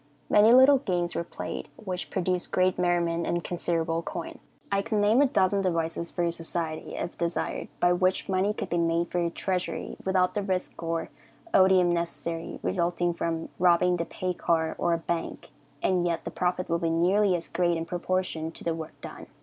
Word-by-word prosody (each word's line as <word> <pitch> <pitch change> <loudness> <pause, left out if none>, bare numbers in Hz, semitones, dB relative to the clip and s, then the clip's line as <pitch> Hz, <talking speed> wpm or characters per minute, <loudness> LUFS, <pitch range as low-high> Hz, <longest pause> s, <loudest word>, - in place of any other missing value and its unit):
Many 210 +2 +7
little 260 +2 +7
games 175 -8 -1
were - - -2
played, 170 - -6
which 185 -4 -5
produced 180 -1 0
great 185 0 +2
merriment 170 -1 +1
and 170 0 -1
considerable 165 -1 -1
coin. 170 0 -6 0.3
I 200 0 +2
could 220 +1 -2
name 210 +5 +4
a 285 - +5
dozen 200 -5 +2
devices 170 -2 -1
for 175 - -2
your 170 - +1
society, 165 -1 -4
if 175 - -5
desired, 170 0 -2
by 175 0 +4
which 185 +1 +1
money 190 +1 +1
could - - -5
be 175 - 0
made 170 0 +1
for 180 - 0
your 170 -1 +1
treasury, 185 +1 -3
without 185 -1 +2
the 205 - -1
risk 185 -3 -3
or 165 0 -2 0.4
odium 185 -2 +5
necessarily 170 -1 -3
resulting 175 -1 0
from 165 -1 -3
robbing 180 0 +4
the 170 - -2
pay 185 +1 -3
car 160 -2 0
or 175 - +2
a - - +2
bank, 165 0 -4 0.3
and 180 -2 +2
yet 170 -1 -1
the - - -4
profit 180 0 -1
will 170 0 0
be 165 - 0
nearly 185 +4 +3
as 170 -1 -3
great 175 -1 +1
in 165 - -3
proportion 175 -2 -2
to - - -10
the 165 - 0
work 160 -1 -8
done." - - -9
175 Hz, 190 wpm, -27 LUFS, 170-185 Hz, 0.4 s, Many